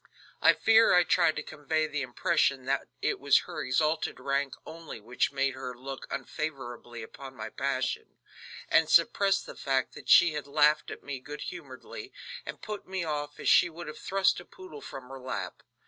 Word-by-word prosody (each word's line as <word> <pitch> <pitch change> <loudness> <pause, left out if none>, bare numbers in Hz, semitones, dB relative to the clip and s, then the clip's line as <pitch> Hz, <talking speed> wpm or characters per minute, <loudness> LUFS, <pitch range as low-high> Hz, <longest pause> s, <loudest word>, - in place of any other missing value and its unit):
I - - +7
fear 225 -3 +5
I 180 - +6
tried 170 -2 +3
to 150 - -3
convey 155 +1 -1
the 150 -1 -3
impression 130 +1 +1
that 135 +1 0 0.2
it - - +1
was - - +5
her - - -6
exalted 155 +5 0
rank 140 0 -1
only 165 -7 -9
which 120 +4 -1
made 135 0 0
her 125 -1 -6
look 135 +1 -7
unfavorably 130 -4 -5
upon 135 +4 -10
my - - -6
passion, - - -2 0.5
and 165 -1 +4
suppressed 195 +3 +4
the - - -8
fact 135 -2 0
that - - -11
she 170 -2 +7
had 150 -1 -4
laughed 150 +1 +3
at - - -8
me 140 -2 -5
good 145 +3 -8
humoredly, 175 - -8 0.4
and - - -7
put 210 -1 -6
me 190 -1 -2
off 145 -2 -4
as - - -4
she 175 - +6
would 170 +1 -9
have 150 - -8
thrust 195 -2 +2
a 175 - -11
poodle 170 -6 -11
from 130 -2 -9
her 135 0 -8
lap. 105 -9 -5
145 Hz, 185 wpm, -29 LUFS, 135-165 Hz, 0.5 s, I